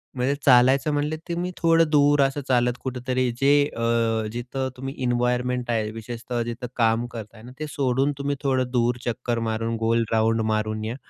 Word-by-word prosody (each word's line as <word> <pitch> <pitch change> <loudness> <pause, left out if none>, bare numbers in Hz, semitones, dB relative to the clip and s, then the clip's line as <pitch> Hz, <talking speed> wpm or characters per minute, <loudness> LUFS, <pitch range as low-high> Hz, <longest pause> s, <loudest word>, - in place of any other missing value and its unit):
म्हणजे 130 +2 0
चालायचं 130 +3 +5
म्हणले, 150 +2 -1
तुम्ही 175 +1 -2
थोडं 165 -1 +3
दूर 145 -1 +4
असं 135 +1 +1
चालत 125 -1 +2
कुठेतरी 130 -1 -1
जे 135 +2 +3 0.2
अ, 115 -1 0
जिथं 130 +3 -4
तुम्ही 135 +1 -5
इन्वायरमेंट 125 0 0
आहे, 110 -2 0
विशेषतः 120 +2 -5
जिथं 120 +1 -5
काम 115 0 +2
करताय 110 -1 -9
ना, 125 - -11
ते 155 - -3
सोडून 135 0 +1
तुम्ही 140 0 -2
थोडं 130 -2 +1
दूर 120 -1 +1
चक्कर 120 0 -2
मारून, 115 +1 -2
गोल 115 +1 +1
राउंड 115 0 +2
मारून 110 0 -1
या. 115 +2 -3
125 Hz, 170 wpm, -24 LUFS, 115-135 Hz, 0.2 s, चालायचं